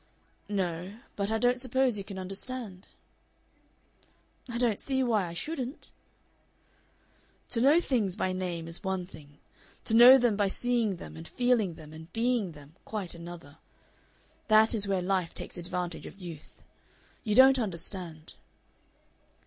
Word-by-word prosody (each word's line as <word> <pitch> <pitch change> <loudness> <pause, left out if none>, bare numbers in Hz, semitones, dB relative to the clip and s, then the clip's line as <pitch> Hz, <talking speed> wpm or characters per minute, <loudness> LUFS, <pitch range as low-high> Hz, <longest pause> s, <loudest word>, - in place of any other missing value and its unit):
"No. 185 0 -3 0.2
But 200 0 -1
I 220 - +1
don't 245 +2 +2
suppose 260 -1 +1
you 200 - -3
can 195 0 -8
understand." 195 +1 -5 1.6
"I 235 - -3
don't 235 -4 +1
see 265 -1 0
why 215 -7 +1
I 170 - -7
shouldn't." 270 - -5 1.6
"To 230 - 0
know 285 +6 +6
things 225 - 0
by 185 -3 -1
name 175 -3 -3
is 165 +4 -2
one 190 -2 -2
thing; 150 -5 -14 0.5
to - - 0
know 245 +3 +10
them 240 -4 +2
by 205 -1 +2
seeing 235 -1 0
them 80 - -10
and 80 +1 -9
feeling 240 -8 +1
them 155 -1 -12
and 160 +2 -11
being 230 -6 0
them 150 +3 -15
quite 205 -5 -4
another. 170 -3 -10 0.9
That 220 +1 +5
is 205 -3 0
where 190 -2 0
life 185 -2 -1
takes - - -7
advantage 175 -1 -4
of - - -12
youth. 165 -5 -10 0.6
You 210 -2 0
don't 265 +1 +7
understand." 170 -5 -3
195 Hz, 145 wpm, -29 LUFS, 175-240 Hz, 1.6 s, know